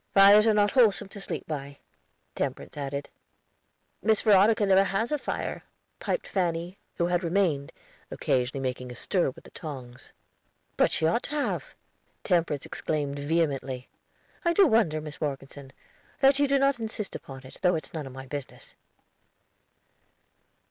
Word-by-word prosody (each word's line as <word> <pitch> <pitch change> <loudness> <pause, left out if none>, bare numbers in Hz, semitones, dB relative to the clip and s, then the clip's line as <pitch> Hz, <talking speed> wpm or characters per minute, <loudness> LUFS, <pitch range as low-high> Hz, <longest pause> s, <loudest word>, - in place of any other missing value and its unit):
"Fires 200 +2 +8
are 220 - +5
not 205 -1 +3
wholesome 225 -6 +3
to 200 - -8
sleep - - -4
by," 140 -2 -5 0.6
Temperance - - -4
added. 140 0 -4 0.9
"Miss 220 -1 +3
Veronica 210 0 +5
never 195 0 +5
has 195 +6 -1
a 300 - +2
fire," - - -4 0.4
piped - - -2
Fanny, 175 0 -2 0.2
who 170 - +1
had 175 +1 0
remained, 170 -5 +1 0.4
occasionally 130 +1 -1
making 125 -1 -3
a - - -8
stir 180 +2 +1
with 130 - -12
the - - -15
tongs. 130 -7 -8 0.6
"But - - +4
she 160 - 0
ought 170 +9 +2
to 300 - -5
have!" 295 - -2 0.5
Temperance 170 -6 +1
exclaimed 145 -2 -3
vehemently. 140 -4 -1 0.5
"I 340 -1 +2
do 395 +2 +6
wonder, 215 - +2
Mis 150 -1 -9
Morgeson, 140 -1 -5 0.5
that 270 +1 +5
you 285 - +4
do 275 0 +3
not 275 -2 +2
insist 220 -2 -4
upon 135 -1 -9
it, 130 - -13
though 180 -1 +3
it's 155 - -5
none 155 -4 -5
of - - -9
my 130 +1 -9
business." 140 0 -8
170 Hz, 155 wpm, -27 LUFS, 140-210 Hz, 0.9 s, Fires